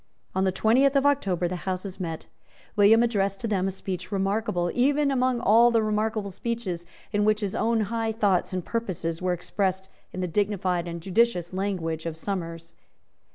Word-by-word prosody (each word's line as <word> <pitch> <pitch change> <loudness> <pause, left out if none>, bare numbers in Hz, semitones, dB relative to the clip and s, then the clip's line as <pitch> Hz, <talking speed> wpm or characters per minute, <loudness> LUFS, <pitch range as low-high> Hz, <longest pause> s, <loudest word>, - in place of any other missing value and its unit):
On 190 0 +1
the 190 - +2
twentieth 250 +8 +3
of 275 0 +3
October 195 -12 +2
the 180 +1 -3
Houses 185 +1 -4
met. 165 -3 -4 0.5
William 215 +3 +6
addressed 200 -4 0
to 230 - -2
them 195 -3 0
a - - +1
speech 185 -1 -5
remarkable 195 -3 0
even 280 +3 +2
among 255 -2 +1
all 235 +1 +5
the 230 -2 +2
remarkable 215 -1 -1
speeches 190 -5 -4 0.2
in 205 -1 +1
which 215 +1 +2
his 200 -2 -2
own 225 0 +1
high 225 +2 -1
thoughts 205 -5 +1
and 185 -2 -3
purposes 180 -8 -3
were 185 0 0
expressed 190 +2 -2 0.2
in - - -6
the 180 - -1
dignified 185 -2 0
and 170 0 -5
judicious 190 -3 +1
language 175 -4 -2
of 160 -1 -5
Somers. 165 -2 -5
195 Hz, 175 wpm, -26 LUFS, 180-225 Hz, 0.5 s, William